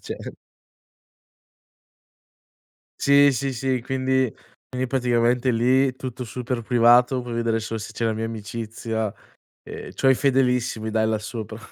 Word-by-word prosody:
cioè - - -7 2.7
Sì, 140 0 +6
sì, 130 +2 -2
sì, 130 0 -1
quindi 130 0 0 0.4
quindi 130 0 -2
praticamente 125 0 +1
lì 130 +3 +2
tutto 130 -1 -6
super 125 +1 -4
privato, 120 +2 +4
puoi 120 -1 -7
vedere 115 -1 0
solo 115 0 -4
se 110 - -7
c'è 115 - -3
la 110 - +1
mia 110 +1 -3
amicizia 110 0 -4 0.5
e - - -9
c'ho 135 - +2
i 130 - +5
fedelissimi 125 -5 +1
dai 110 0 +1
là 110 -1 +1
sopra. 110 0 -7
120 Hz, 135 wpm, -23 LUFS, 115-130 Hz, 2.7 s, Sì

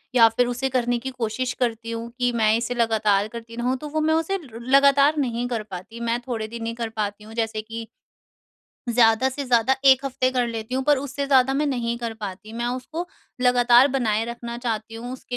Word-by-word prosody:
या 230 -2 +8
फिर 245 +2 +1
उसे 250 +2 -2
करने 245 -1 0
की 265 +2 -5
कोशिश 250 +1 -2
करती 230 -2 -1
हूँ 230 0 -5
कि 245 0 +2
मैं 220 -2 +2
इसे 245 +1 -2
लगातार 215 -3 +2
करती 230 +1 -9
रहूँ 245 +2 0
तो 300 - -7
वो 310 +1 -1
मैं 315 +1 +2
उसे 325 +5 0
रु 230 -2 -11
लगातार 275 +4 +4
नहीं 245 -3 -1
कर 230 -3 -3
पाती, 200 +3 -9
मैं 235 0 -1
थोड़े 220 -3 -3
दिन 230 0 -6
ही 230 - -3
कर 230 -1 -4
पाती 210 -1 -4
हूँ 220 +1 -12
जैसे 225 -1 -2
कि, 225 +1 -7 1.0
ज़्यादा 235 +1 +4
से 275 +2 -5
ज़्यादा 245 0 +3
1 270 0 +6
हफ़्ते 255 -1 0
कर 250 -2 0
लेती 230 +1 -5
हूँ 265 - 0
पर 295 -1 +4
उससे 280 +1 -4
ज़्यादा 270 -1 +4
मैं 295 +2 +1
नहीं 235 -3 -1
कर 235 -2 -3
पाती। 205 +2 -7
मैं 235 +1 -3
उसको 260 +8 -4 0.3
लगातार 245 +1 +5
बनाए 225 -5 0
रखना 235 0 -6
चाहती 225 -2 -3
हूँ 240 +2 -6
उसके 255 -1 -6
240 Hz, 215 wpm, -23 LUFS, 225-260 Hz, 1.0 s, या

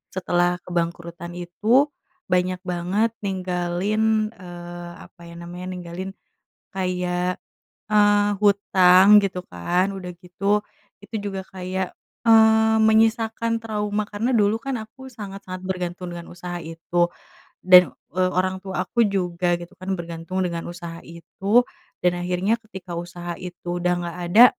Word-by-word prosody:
setelah 175 -1 +1
kebangkrutan 170 0 -3
itu 215 +10 +2 0.4
banyak 180 0 +2
banget 185 +5 0
ninggalin, 195 +4 0
eee, 175 -3 -9
apa 170 - -20
ya 170 - -11
namanya 175 +1 -7
ninggalin, 180 +2 -6 0.6
kayak, 180 -1 -1 0.5
eee, 205 -1 +4
hutang 195 -1 +6
gitu 185 -2 -2
kan 180 - 0
udah 180 -2 -6
gitu 200 +3 0 0.4
itu - - -14
juga 200 -1 -4
kayak, 185 0 -4 0.3
eee, 220 0 +6
menyisakan 225 +1 +3
trauma 210 -1 -1
karena 225 +5 -1
dulu 210 0 +3
kan 275 -2 -2
aku 260 +5 -11
sangat-sangat 195 -4 -8
bergantung 180 -1 -4
dengan 170 -1 -8
usaha 175 0 -6
itu 165 +2 0 0.5
dan, 180 -1 +7 0.2
eee, 185 0 +2
orang 185 +1 +1
tua 190 -1 -2
aku 235 -2 +2
juga 180 -3 0
gitu 175 +2 -11
kan 190 +1 -2
bergantung 170 +2 -4
dengan 170 -2 -3
usaha 170 -1 -8
itu 190 +7 +1 0.4
dan 175 0 +2
akhirnya 185 +6 +1
ketika 190 -5 -9
usaha 175 0 -6
itu 175 -1 -5
udah 180 0 +2
nggak 170 0 -5
ada, 225 +7 +9
185 Hz, 130 wpm, -23 LUFS, 175-205 Hz, 0.6 s, ada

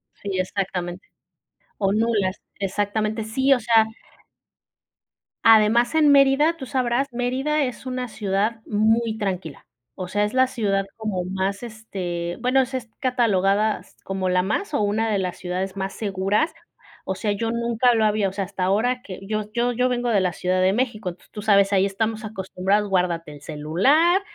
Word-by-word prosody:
Sí, 195 -2 -4
exactamente. 185 -1 -3 0.7
O 195 -1 +1
nulas, 210 -3 0 0.2
exactamente, 210 +3 -1
sí, 265 +5 +1
o 250 - -2
sea 225 -1 +4 1.6
Además 225 +4 +5
en 305 -2 +5
Mérida, 280 +4 +4
tú 270 - -7
sabrás, 255 0 0
Mérida 260 +5 0
es 255 0 -5
una 255 -1 -3
ciudad 210 +2 -1
muy 220 +1 +1
tranquila, 185 -7 -4 0.3
o 185 - -5
sea, 205 +2 +1
es 210 - -4
la 260 0 +4
ciudad 200 -6 0
como 215 -5 -2
más, 190 +3 -2
este 180 -7 -5
bueno, 255 +2 +3
s 260 +1 -3
es 240 -3 -5
catalogada 215 -5 +2
s - - -20
como 190 -1 -2
la 180 0 +3
más 260 - -2
o 285 - +1
una 215 +2 +1
de 210 - +1
las 185 -2 -3
ciudades 185 +2 -4
más 195 0 -3
seguras, 205 - 0 0.5
o 190 - -2
sea, 210 +2 -1
yo 225 +3 -1
nunca 235 +1 +2
lo 220 - +2
había 210 -1 +2
o 190 - -5
sea, 195 0 -2
hasta 190 -1 -4
ahora 240 +7 +1
que 190 -5 -9
yo 215 0 -3
yo 240 +1 +1
yo 250 +1 +1
vengo 245 -1 -1
de 215 -4 +3
la 180 -2 0
ciudad 185 +2 0
de 185 +1 +3
México, 215 -6 -2
t - - -26
tú 210 - -7
sabes, 200 -1 +4
ahí 195 -1 +3
estamos 215 +3 -2
acostumbrados, 200 0 -1
"Guárdate 175 -4 0
el 145 - -13
celular, 195 - +2
215 Hz, 175 wpm, -23 LUFS, 190-240 Hz, 1.6 s, Además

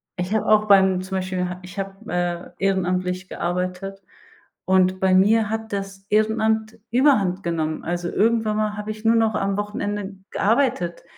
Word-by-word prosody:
Ich 180 +3 -3
habe 220 - +1
auch 215 0 +4
beim 190 -2 +5
zum 190 +1 -4
Beispiel, 185 -1 -2
ha 180 0 -6
ich 185 +2 -11
hab, 195 +3 -6
äh, 175 -2 -2
ehrenamtlich 185 -1 0
gearbeitet. 180 +3 -3 0.6
Und 185 0 +3
bei 190 -1 +3
mir 210 +3 +4
hat 220 0 -4
das 195 -1 -5
Ehrenamt 220 +1 +1
überhand 220 -8 +3
genommen. 160 -2 -2
Also, 175 +1 -2
irgendwann 220 +1 +1
mal 210 -1 -1
hab 210 0 -6
ich 215 0 -6
nur 230 +1 +5
noch 225 -1 +2
am 195 0 -1
Wochenende 205 -1 -3 0.2
gearbeitet. 220 -6 0
195 Hz, 160 wpm, -22 LUFS, 185-215 Hz, 0.6 s, beim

